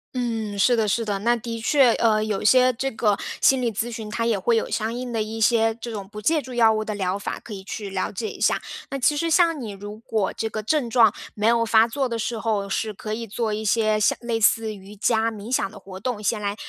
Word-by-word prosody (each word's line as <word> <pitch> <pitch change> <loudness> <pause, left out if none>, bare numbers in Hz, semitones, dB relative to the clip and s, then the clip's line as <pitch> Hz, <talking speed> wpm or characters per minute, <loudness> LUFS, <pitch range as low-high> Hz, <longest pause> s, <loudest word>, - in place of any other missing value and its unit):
嗯， 225 -4 -2
是 240 +5 +4
的 220 -2 +1
是 230 +3 0
的， 205 -2 -2
那 235 +4 +2
的 230 0 -5
确。 260 -1 +4
呃， 215 -2 +3
有 215 -2 -2
一 - - -5
些 255 +3 +5
这 265 +3 -2
个 220 -4 +1 0.3
心 265 -1 +4
理 235 -2 0
咨 225 +3 -3
询， 225 -2 -6
它 230 +1 -2
也 225 -4 +1
会 230 +5 +2
有 225 - 0
相 220 0 -2
应 245 0 -5
的 225 - 0
一 220 +1 -4
些 225 0 +3
这 235 +1 -7
种 200 -3 -6
不 210 0 -8
借 310 +9 +2
助 260 - -11
药 225 -2 +5
物 215 0 -1
的 215 -1 -4
疗 190 0 -1
法， - - -5
可 220 - -10
以 195 -1 -8
去 205 0 -6
了 190 -1 -2
解 220 +3 -4
一 - - -11
下。 - - +3 0.3
那 275 - -3
其 275 +3 +2
实 330 +3 -1
像 330 -2 +3
你 225 - -5
如 205 +2 -9
果 220 -3 -1
这 220 - -3
个 215 0 -5
症 260 +2 0
状 225 -3 +5 0.2
没 210 - -2
有 230 0 +4
发 225 0 +4
作 265 +2 -2
的 230 - -2
时 225 +1 -3
候， 215 -3 -1
是 215 +2 -2
可 215 +1 -6
以 230 +1 -4
做 220 +1 -2
一 215 +1 -3
些 215 0 +2
像 210 - +2
类 235 -2 -1
似 220 0 +3
瑜 200 +1 -12
伽、 225 +2 +1
冥 215 +1 -8
想 195 - +1
的 215 - -13
活 190 -1 -10
动， 215 0 -3
先 215 +1 0
来 200 0 -2
225 Hz, 290 characters per minute, -23 LUFS, 210-235 Hz, 0.3 s, 些